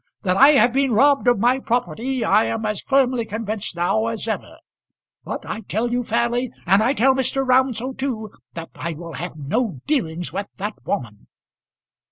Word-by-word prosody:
That 185 Hz, -2 st, +1 dB
I 275 Hz, +8 st, +7 dB
have 240 Hz, -3 st, +4 dB
been 270 Hz, -2 st, +2 dB
robbed 275 Hz, +3 st, +4 dB
of 245 Hz, -, +5 dB
my 245 Hz, +5 st, +2 dB
property 245 Hz, 0 st, -1 dB
I 215 Hz, -, +4 dB
am 225 Hz, -1 st, -2 dB
as 210 Hz, -1 st, -2 dB
firmly 260 Hz, -3 st, +2 dB
convinced 220 Hz, -3 st, -4 dB
now 195 Hz, +6 st, +1 dB
as 225 Hz, -1 st, -4 dB
ever. 220 Hz, -, -4 dB, 0.7 s
But -, -, -6 dB
I 225 Hz, -, -5 dB
tell 225 Hz, +3 st, -2 dB
you 245 Hz, 0 st, 0 dB
fairly, 235 Hz, +2 st, 0 dB, 0.2 s
and 195 Hz, +3 st, +4 dB
I 250 Hz, +5 st, +2 dB
tell 265 Hz, +3 st, +4 dB
Mr. 265 Hz, +1 st, -1 dB
Round 255 Hz, -1 st, +3 dB
so 255 Hz, +4 st, -4 dB
too, 245 Hz, -6 st, -4 dB, 0.2 s
that 165 Hz, -1 st, -7 dB
I 170 Hz, 0 st, -4 dB
will 165 Hz, +1 st, -9 dB
have 165 Hz, +2 st, -6 dB
no 160 Hz, -, -2 dB
dealings 175 Hz, -, -1 dB
with 200 Hz, +1 st, -3 dB
that 205 Hz, +2 st, -3 dB
woman." 115 Hz, -, -4 dB
225 Hz, 185 wpm, -21 LUFS, 200-255 Hz, 0.7 s, I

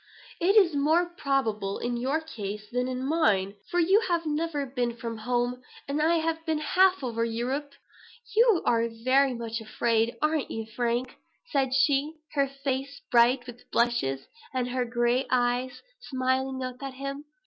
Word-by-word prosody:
It 380 Hz, +5 st, +3 dB
is 370 Hz, -6 st, +6 dB
more 320 Hz, +5 st, +2 dB
probable 225 Hz, -, -1 dB
in 240 Hz, 0 st, -2 dB
your 265 Hz, +6 st, 0 dB
case 210 Hz, -9 st, -6 dB
than 250 Hz, +1 st, 0 dB
in 255 Hz, 0 st, -3 dB
mine; 220 Hz, -, +2 dB, 0.2 s
for 350 Hz, -, +1 dB
you 375 Hz, +5 st, +5 dB
have 340 Hz, -2 st, 0 dB
never 305 Hz, -1 st, -1 dB
been 245 Hz, -3 st, -2 dB
from 230 Hz, -2 st, -5 dB
home, 245 Hz, +2 st, -1 dB, 0.3 s
and 285 Hz, +2 st, -1 dB
I 325 Hz, +2 st, +3 dB
have 325 Hz, 0 st, -1 dB
been 320 Hz, -1 st, 0 dB
half 370 Hz, +3 st, +3 dB
over 230 Hz, -2 st, -1 dB
Europe." 255 Hz, +5 st, -2 dB, 0.6 s
"You 450 Hz, -5 st, +5 dB
are 230 Hz, 0 st, +2 dB
very 255 Hz, +3 st, +2 dB
much 230 Hz, -1 st, -4 dB
afraid, 225 Hz, +1 st, 0 dB
are 305 Hz, +1 st, +2 dB
not 290 Hz, -, -4 dB
you, 225 Hz, 0 st, -4 dB
Frank?" 240 Hz, +2 st, -2 dB, 0.3 s
said 265 Hz, -3 st, +1 dB
she, 280 Hz, +2 st, +2 dB, 0.2 s
her 280 Hz, -2 st, +2 dB
face 275 Hz, 0 st, -4 dB
bright 245 Hz, +1 st, +4 dB
with 245 Hz, -1 st, -12 dB
blushes, 135 Hz, -, +1 dB, 0.3 s
and 250 Hz, -1 st, 0 dB
her 250 Hz, 0 st, -1 dB
gray 240 Hz, +2 st, +1 dB
eyes 245 Hz, 0 st, 0 dB, 0.2 s
smiling 260 Hz, -, -1 dB
up 255 Hz, 0 st, -6 dB
at 270 Hz, -1 st, -6 dB
him. 275 Hz, +2 st, -5 dB
260 Hz, 165 wpm, -27 LUFS, 240-295 Hz, 0.6 s, is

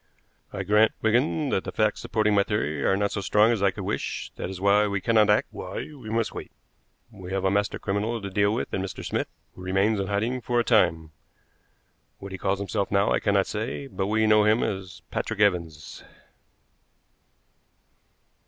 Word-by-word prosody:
"I 95 Hz, -, -4 dB
grant, 105 Hz, +3 st, +4 dB
Wigan, 130 Hz, +6 st, +2 dB
that 95 Hz, -, 0 dB
the -, -, -5 dB
facts 110 Hz, -1 st, +1 dB
supporting 110 Hz, -1 st, +1 dB
my 100 Hz, -, +4 dB
theory 80 Hz, -9 st, -1 dB
are 95 Hz, -, +2 dB
not 100 Hz, 0 st, 0 dB
so 100 Hz, -, -3 dB
strong 105 Hz, +3 st, +4 dB
as 115 Hz, -4 st, -1 dB
I 100 Hz, -, +4 dB
could 100 Hz, +1 st, -6 dB
wish; 100 Hz, -, -3 dB
that -, -, -5 dB
is 95 Hz, -1 st, -7 dB
why 100 Hz, +2 st, +4 dB
we 100 Hz, 0 st, -1 dB
cannot 110 Hz, +1 st, +3 dB
act, 105 Hz, -, +3 dB
why -, -, -7 dB, 0.2 s
we 125 Hz, -7 st, -10 dB
must 115 Hz, 0 st, -1 dB
wait. -, -, -7 dB, 0.6 s
We 95 Hz, -4 st, -10 dB
have 95 Hz, 0 st, -1 dB
a 95 Hz, -, +3 dB
master 100 Hz, 0 st, 0 dB
criminal 105 Hz, +4 st, -2 dB
to 100 Hz, -2 st, -6 dB
deal 100 Hz, +1 st, +2 dB
with 115 Hz, -, -3 dB
in 95 Hz, -, -1 dB
Mr. 95 Hz, -1 st, -6 dB
Smith, -, -, -1 dB, 0.3 s
who -, -, -13 dB
remains 95 Hz, +3 st, +1 dB
in 95 Hz, -, -2 dB
hiding 110 Hz, +6 st, -1 dB
for 120 Hz, 0 st, 0 dB
a -, -, +2 dB
time. 80 Hz, -9 st, +2 dB, 1.1 s
What 100 Hz, 0 st, -9 dB
he 95 Hz, -, -6 dB
calls 95 Hz, +1 st, 0 dB
himself 100 Hz, 0 st, -2 dB
now 100 Hz, 0 st, +2 dB
I -, -, +2 dB
cannot 100 Hz, -2 st, +2 dB
say, 110 Hz, +6 st, -4 dB
but 100 Hz, -8 st, -3 dB
we 110 Hz, +1 st, +2 dB
know 105 Hz, -1 st, +5 dB
him 110 Hz, +2 st, +3 dB
as 95 Hz, -2 st, -5 dB
Patrick 115 Hz, -2 st, -3 dB
Evans." 85 Hz, -7 st, 0 dB
100 Hz, 195 wpm, -26 LUFS, 95-110 Hz, 1.1 s, know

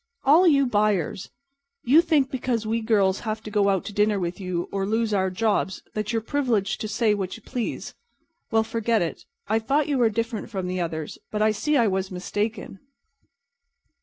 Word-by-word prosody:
"All 320 Hz, +7 st, +6 dB
you 280 Hz, -4 st, +5 dB
buyers. 205 Hz, -, 0 dB, 0.5 s
You 285 Hz, +7 st, +6 dB
think 300 Hz, -6 st, +2 dB
because 245 Hz, -3 st, -1 dB
we 225 Hz, +1 st, 0 dB
girls 200 Hz, -4 st, +2 dB
have 220 Hz, -1 st, -4 dB
to 210 Hz, -, -7 dB
go 200 Hz, -1 st, +3 dB
out 190 Hz, -2 st, 0 dB
to 210 Hz, -, -6 dB
dinner 210 Hz, 0 st, +2 dB
with 175 Hz, +1 st, -3 dB
you 180 Hz, -2 st, -3 dB
or 195 Hz, -1 st, -1 dB
lose 220 Hz, 0 st, 0 dB
our 190 Hz, -1 st, +2 dB
jobs 195 Hz, -1 st, -1 dB
that 215 Hz, +1 st, -2 dB
you're 225 Hz, -2 st, -1 dB
privileged 225 Hz, -7 st, 0 dB
to 215 Hz, -, -2 dB
say 220 Hz, 0 st, +2 dB
what 195 Hz, 0 st, -3 dB
you 225 Hz, -, -18 dB
please. 245 Hz, -4 st, -4 dB, 0.6 s
Well, 225 Hz, -1 st, +3 dB
forget 225 Hz, -2 st, 0 dB
it. 165 Hz, -, -5 dB, 0.2 s
I 220 Hz, +2 st, +2 dB
thought 275 Hz, +6 st, +1 dB
you 285 Hz, -3 st, 0 dB
were 235 Hz, -2 st, +4 dB
different 230 Hz, 0 st, -3 dB
from 190 Hz, -5 st, -4 dB
the 180 Hz, 0 st, -2 dB
others, 160 Hz, -3 st, -4 dB
but 215 Hz, 0 st, 0 dB
I 215 Hz, -, +4 dB
see 295 Hz, +8 st, 0 dB
I 235 Hz, -, +4 dB
was 190 Hz, -1 st, -1 dB
mistaken." 205 Hz, +2 st, -4 dB
215 Hz, 195 wpm, -25 LUFS, 195-235 Hz, 0.6 s, All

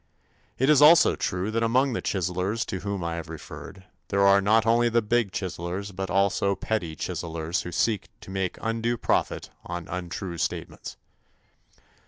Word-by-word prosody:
It 130 Hz, -, +2 dB
is 150 Hz, -1 st, +6 dB
also 155 Hz, +3 st, +7 dB
true 95 Hz, +4 st, -2 dB
that 115 Hz, +1 st, 0 dB
among 125 Hz, +4 st, +2 dB
the -, -, -2 dB
chiselers 95 Hz, +4 st, -1 dB
to 95 Hz, -, -4 dB
whom 100 Hz, -2 st, -3 dB
I 85 Hz, 0 st, -2 dB
have 80 Hz, -1 st, -7 dB
referred, 90 Hz, +4 st, -9 dB, 0.2 s
there 100 Hz, 0 st, +2 dB
are 100 Hz, 0 st, +6 dB
not 110 Hz, +2 st, +3 dB
only 120 Hz, +1 st, +4 dB
the 115 Hz, 0 st, +3 dB
big 115 Hz, -2 st, +1 dB
chiselers 90 Hz, +2 st, -4 dB
but 95 Hz, 0 st, -4 dB
also 100 Hz, +1 st, +2 dB
petty 95 Hz, -5 st, -2 dB
chiselers 80 Hz, +3 st, -3 dB
who 90 Hz, -, -7 dB
seek 105 Hz, +2 st, 0 dB
to -, -, -10 dB
make 95 Hz, -1 st, -2 dB
undue 115 Hz, +1 st, -1 dB
profit -, -, -1 dB
on 85 Hz, -1 st, -6 dB
untrue 90 Hz, 0 st, -5 dB
statements. -, -, -4 dB
100 Hz, 165 wpm, -26 LUFS, 90-115 Hz, 0.2 s, also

